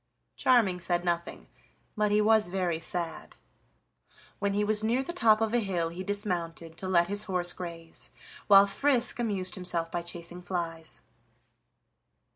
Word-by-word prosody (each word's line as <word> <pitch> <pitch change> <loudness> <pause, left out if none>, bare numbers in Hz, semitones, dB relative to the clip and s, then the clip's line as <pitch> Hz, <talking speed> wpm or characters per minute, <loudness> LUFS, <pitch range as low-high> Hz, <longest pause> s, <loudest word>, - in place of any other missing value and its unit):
Charming 220 -8 +3
said 175 0 -1
nothing, 170 0 -3 0.5
but 210 -1 +1
he 210 +1 +3
was 220 -1 +4
very 175 -3 -1
sad. 170 0 -3 1.0
When 200 0 0
he 205 - +2
was 215 0 0
near 240 +4 +1
the 345 - -5
top 225 -10 +4
of 225 0 0
a 240 - +3
hill 180 -6 -1
he 175 +3 -6
dismounted 175 -5 -4
to 190 - -4
let 175 -2 +4
his 205 +3 -1
horse 180 -2 +1
graze, 165 -2 -8 0.4
while 200 -1 +8
Frisk 245 +4 +2
amused 195 -6 -1
himself 175 -3 -2
by 175 - -2
chasing 170 +1 -9
flies. 170 -3 -5
185 Hz, 150 wpm, -29 LUFS, 170-210 Hz, 1.0 s, while